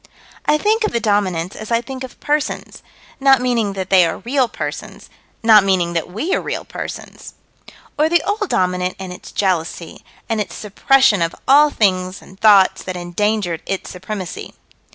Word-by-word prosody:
I 300 - +4
think 435 +6 +1
of 430 - -1
the 235 - +1
Dominants 195 -5 0
as 215 - -8
I 230 -1 +2
think 260 +2 -7
of 260 - -10
persons 295 0 -2 0.4
not 270 -1 +5
meaning 235 -5 0
that 190 -1 -5
they 185 -2 +7
are 165 - -1
real 255 +1 0
persons - - -7 0.3
not 220 -3 +7
meaning 180 -3 +1
that 165 0 -2
we 225 - -2
are - - +1
real - - -4
persons - - -8 0.6
Or 310 +1 +3
the 345 -1 +2
Old 415 0 -2
Dominant 180 0 0
and 190 -1 -7
its - - -12
jealousy, 175 -3 -2 0.2
and 225 -2 -1
its 205 - -5
suppression 215 0 +3
of 165 0 -1
all 295 +3 +6
things 185 -6 0
and 190 - -17
thoughts 205 -3 +5
that 185 -1 -5
endangered 175 0 -1
its 195 - -4
supremacy. 185 -1 -7
205 Hz, 175 wpm, -19 LUFS, 185-260 Hz, 0.6 s, they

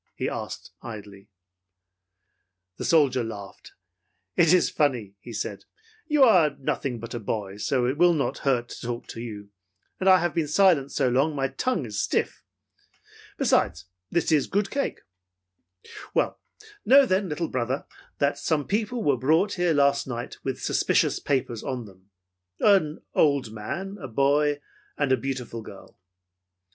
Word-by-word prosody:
he - - -2
asked, - - -6
idly. 100 -3 -10 1.5
The - - -4
soldier 140 -6 +3
laughed. 100 -3 -9 0.6
"It 165 -2 +5
is 180 -1 +5
funny," 125 -9 0
he 120 - -11
said. 105 -2 -5 0.4
"You 300 -3 +4
are 175 - +5
nothing 130 -2 -2
but 115 +1 -8
a 120 - -3
boy, 100 -2 -4
so 120 +5 0
it 130 +5 -1
will 175 -1 +5
not 135 -5 -1
hurt 125 -3 0
to - - -9
talk 120 -1 -4
to 115 - -7
you, 105 -3 -8 0.5
and 190 - +3
I 185 - +8
have 175 -3 -1
been 160 -1 0
silent 150 -4 +3
so - - +1
long 130 +5 +2
that 155 - -7
my 135 -1 0
tongue's 140 - -2
stiff. - - -1 1.0
Besides, - - +1 0.2
this 170 -1 0
is 150 -4 +3
good 200 0 0
cake. 280 0 -2 1.1
Well, - - +1 0.4
know 275 +2 +7
then, 190 -4 0
little 160 +2 -2
brother, 130 +2 -2 0.3
that 140 0 +1
some 150 -3 0
people 220 +3 -1
were 140 -3 +2
brought 160 - +2
here 175 -2 +1
last 140 -2 +2
night 120 -1 -5
with 135 -1 -4
suspicious - - +2
papers 125 -5 -1
on 125 -3 -4
them. 95 -1 -18 0.5
An 185 -7 +3
old 140 -7 +2
man, 185 - -5
a 130 - -5
boy 145 +4 +2 0.4
and 145 -2 0
a - - +6
beautiful 125 -4 -4
girl. 100 -2 -13
140 Hz, 155 wpm, -26 LUFS, 120-170 Hz, 1.5 s, I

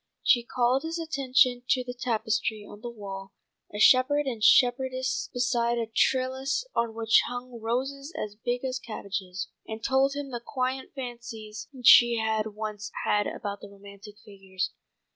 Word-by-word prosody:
She 240 -2 +4
called 250 +1 +1
his 325 +1 -4
attention 260 -6 +2
to 255 -2 +3
the 245 0 -6
tapestry 220 -3 -1
on 205 - -12
the 240 - -5
wall, 195 -3 -8 0.4
a 205 - -6
shepherd 265 +6 +5
and 235 -5 -3
shepherdess 260 +2 +3
beside 240 -1 +1
a 230 - 0
trellis 260 - 0
on 235 -1 0
which 225 -1 +4
hung 245 -1 -7
roses 270 +6 -2
as 210 - -4
big 245 +4 -3
as 255 0 -2
cabbages, 195 -5 -5 0.2
and 220 0 -7
told 270 +1 +2
him 285 -1 -5
the 240 -1 -4
quaint 260 +1 -3
fancies 235 -4 -7 0.2
she 240 0 +8
had 220 -1 -1
once 215 -1 -5 0.2
had 205 0 +2
about 200 -1 -5
the 205 - -10
romantic 200 +1 -13
figures. 195 -2 -5
240 Hz, 155 wpm, -27 LUFS, 215-260 Hz, 0.4 s, she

